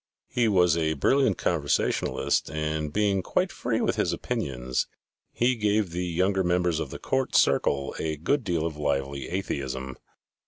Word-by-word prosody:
He 120 -2 +1
was 90 -5 +4
a 80 -1 +1
brilliant 130 - +2
conversationalist - - 0
and 75 -1 -2
being 100 +1 +1
quite - - 0
free - - -1
with - - 0
his - - +1
opinions, 65 -1 -2 0.4
he 125 +2 +2
gave 105 -4 +1
the 90 +1 -2
younger 95 +3 +1
members 90 -2 +1
of 80 - -3
the - - -7
court 130 -1 -1
circle 70 0 +2
a 80 -1 -2
good 125 - 0
deal 85 -5 -1
of 80 -2 -3
lively 70 -2 -2
atheism. 65 -8 -3
85 Hz, 155 wpm, -26 LUFS, 70-100 Hz, 0.4 s, was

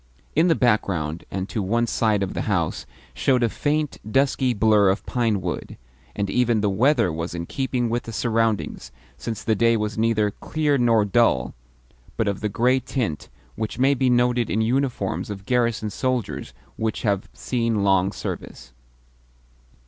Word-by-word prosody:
In 160 +3 +4
the 165 - +4
background, 90 - 0
and 95 0 -3
to 110 - -2
one 115 +5 +1
side 110 -3 +1
of 95 - -3
the - - -2
house, 85 -6 -1 0.3
showed 125 -2 +2
a 115 - +3
faint, 150 +2 -1
dusky 135 -1 +2
blur 105 -3 +4
of 95 +2 -1
pinewood, 105 -8 -2 0.4
and 100 -1 -1
even 120 +1 +2
the 105 -1 +1
weather 115 - +2
was 80 +2 -4
in 85 0 -4
keeping 130 +2 -1
with 120 +1 -1
the 115 - -6
surroundings, 115 -1 -1 0.2
since 110 +9 -5
the 110 - +2
day 115 +2 +3
was 105 0 -3
neither 110 -2 +2
clear 150 +4 -1
nor 115 -3 +4
dull, 95 - +2 0.6
but 110 - 0
of 100 -1 -1
the 105 - -1
grey 125 +5 +2
tint 115 - -3 0.3
which 110 0 -4
may 135 +2 +4
be 130 -1 +1
noted 120 -1 +2
in 110 - +1
uniforms 110 -7 -1
of 100 -1 -7
garrison 115 -3 0
soldiers 130 0 -2 0.2
which 110 -1 -2
have 100 -3 0
seen 115 -4 -1
long 95 -1 +3
service. 85 - -7
110 Hz, 165 wpm, -23 LUFS, 100-125 Hz, 0.6 s, In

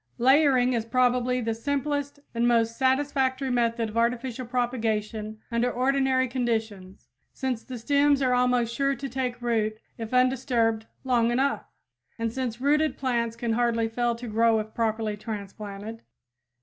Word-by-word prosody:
Layering 260 -1 +4
is 230 -2 0
probably 250 +1 +1
the 225 -1 -1
simplest 285 +4 -2
and 235 0 +1
most 230 -1 +2
satisfactory 265 0 +1
method 235 -2 +1
of 215 - -6
artificial 240 +1 -1
propagation 220 -3 -2
under 235 +1 +1
ordinary 260 0 +2
conditions, 220 -6 -3 0.3
since 255 -4 -3
the 255 -2 -7
stems 285 +4 +3
are 255 -2 +2
almost 250 -2 +2
sure 275 +2 +1
to 275 - -5
take 255 -2 -3
root 220 -2 0 0.2
if 225 -1 -5
undisturbed 250 -3 +1 0.2
long 240 -3 +2
enough; 265 +4 0 0.5
and 230 -1 -2
since 245 -3 -3
rooted 300 +3 +2
plants 235 -3 -1
can 235 -1 -2
hardly 230 -1 +1
fail 235 +1 0
to 240 +1 -8
grow 225 +1 +3
if 215 0 -4
properly 220 -2 -1
transplanted. 210 +1 -7
240 Hz, 145 wpm, -26 LUFS, 225-260 Hz, 0.5 s, Layering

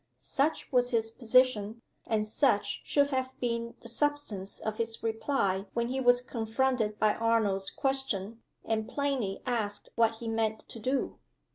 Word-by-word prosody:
Such 290 +3 0
was 245 -2 +3
his 225 -2 +1
position, 230 -2 +2 0.2
and 215 -1 +1
such 215 -1 +1
should 285 -1 +2
have 260 -1 -2
been 235 -1 -2
the - - -10
substance 235 -7 -1
of 215 0 -4
his 225 0 -2
reply 220 -4 0
when 235 0 0
he 265 +1 -1
was 245 -1 +5
confronted 230 -2 0
by 215 -1 +3
Arnold's 215 -4 +1
question, 230 -6 -1 0.2
and 220 0 -1
plainly 270 -9 -1
asked 215 -5 -2
what 230 -1 +3
he 230 +1 -7
meant 220 -1 -1
to 230 - -8
do. 260 +5 -1
230 Hz, 150 wpm, -30 LUFS, 215-255 Hz, 0.2 s, was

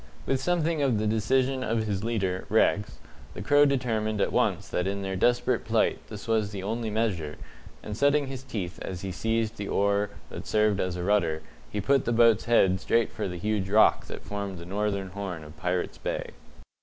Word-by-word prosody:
With 135 -1 0
something 165 -1 +1
of 130 -6 +2
the 105 - -1
decision 130 +5 +1
of 115 -2 0
his 100 -2 -2
leader, 95 -5 -1
Rex, 105 -1 +2 0.4
the - - -6
Crow 145 +1 +5
determined 115 -6 0
at - - +1
once - - +1
that 90 +1 -1
in 100 0 -2
their 95 0 -3
desperate 120 +5 +2
plight - - +1
this 105 0 -8
was 110 -2 +1
the 100 -2 -6
only 110 +2 -2
measure, 100 -9 -1 0.5
and 105 - -5
setting 145 +4 +3
his 135 -1 -6
teeth 105 -9 -5
as 90 -2 -5
he 95 - -4
seized 115 +3 -1
the 100 - -4
oar 100 0 +1 0.2
that - - -7
served 105 -2 +2
as 90 -1 -1
a 90 - -4
rudder, 85 -6 +1 0.3
he 105 - -3
put 135 +6 +2
the 120 - 0
boat's 115 -2 +4
head 95 -5 +3
straight 115 -1 +2
for - - -3
the 90 -1 -5
huge 100 +1 -1
rock 110 +2 +4
that - - -8
formed 100 -2 -4
the 85 - -9
northern 100 0 -2
horn 95 -5 -5
of 75 +1 -12
Pirates' 90 +2 -2
Bay. - - -3
105 Hz, 200 wpm, -27 LUFS, 95-115 Hz, 0.5 s, Crow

